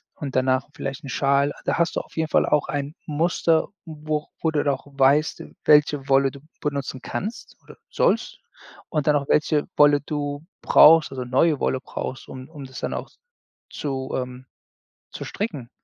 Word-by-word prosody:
und 140 -4 -6
danach 130 +1 +1
vielleicht 135 -1 -5
'n 135 - -7
Schal.“ 140 +1 +2
Da - - 0
hast 170 -1 +1
du - - +3
auf - - -20
jeden 160 -1 -1
Fall - - +3
auch 150 -2 +1
ein 145 +2 -3
Muster, 160 +1 +1 0.2
wo 155 -1 -4
wo 160 - +1
du 150 -2 0
noch 140 -1 -1
weißt, 140 +2 +2 0.2
welche 150 -2 +4
Wolle 135 -1 +4
du 140 - -12 0.2
benutzen 140 -3 -3
kannst 215 - -6
oder - - -14
sollst. - - 0 0.5
Und 150 -3 -1
dann 150 - +5
auch 140 - -4
welche 150 -1 +2
Wolle 145 -1 +6
du 145 0 -4 0.2
brauchst 160 -1 +7
also 130 -2 -4
neue 135 +4 +2
Wolle 130 - 0
brauchst, 130 - -6
um 130 +2 -9
um 150 -4 -10
das 130 -1 -9
dann - - -3
auch - - -5 0.6
zu 135 -2 -4
ähm, 125 0 -5 0.7
zu - - -7
stricken. 155 - -4
145 Hz, 175 wpm, -23 LUFS, 135-150 Hz, 0.7 s, brauchst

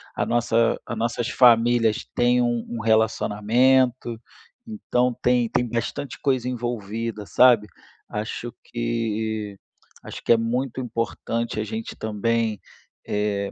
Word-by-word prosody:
a - - 0
nossa 115 -1 +1
a 120 - -5
nossas 115 +1 -2
famílias 120 -3 +4
têm 125 0 +3
um 120 -1 0
um 120 - -4
relacionamento, 115 +3 +2 0.5
então 125 - 0
tem 125 -2 +2
tem 125 - 0
bastante 120 +4 -4
coisa 130 -4 0
envolvida, 115 -3 -4
sabe, 120 -2 +5 0.4
acho 110 +3 -5
que 110 -3 -3 0.5
acho - - -9
que - - +1
é 115 - +4
muito 125 +3 -2
importante 115 -1 -3
a - - 0
gente 110 +1 -5
também, 110 0 -1 0.5
eh, 105 -1 -1
115 Hz, 120 wpm, -24 LUFS, 110-120 Hz, 0.5 s, sabe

